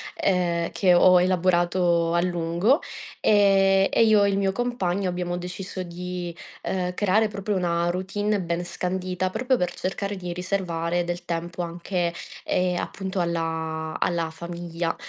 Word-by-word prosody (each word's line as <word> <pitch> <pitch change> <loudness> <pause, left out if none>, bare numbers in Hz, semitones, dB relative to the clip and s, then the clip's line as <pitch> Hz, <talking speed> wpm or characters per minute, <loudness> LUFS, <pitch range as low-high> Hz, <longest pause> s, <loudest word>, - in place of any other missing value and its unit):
ehm, 175 -3 0
che 185 -3 +3
ho 180 0 +7
elaborato 175 -2 +2
a 170 - +3
lungo, 175 - +1 0.4
ehm, 195 -2 +4
e - - +4
io 215 -2 +5
e 200 - +3
il 195 - 0
mio 195 -1 +1
compagno 195 -5 -1
abbiamo 175 0 -2
deciso 185 +1 -5
di, 175 0 -6 0.3
ehm, 180 -1 -2
creare 210 +2 +3
proprio 205 0 -3
una 170 -1 +1
routine 200 +2 -1
ben 170 0 -2
scandita, 185 +1 -2
proprio 250 +6 +1
per 180 -4 -1
cercare 200 +2 -3
di 180 -2 -5
riservare 175 -2 -1
del 175 0 -4
tempo 170 +1 -3
anche, 175 0 -2 0.3
ehm, 180 -1 +1
appunto 190 -1 -4
alla 160 -2 -2
alla 170 -2 0
famiglia. 170 0 -4
180 Hz, 145 wpm, -25 LUFS, 170-195 Hz, 0.4 s, ho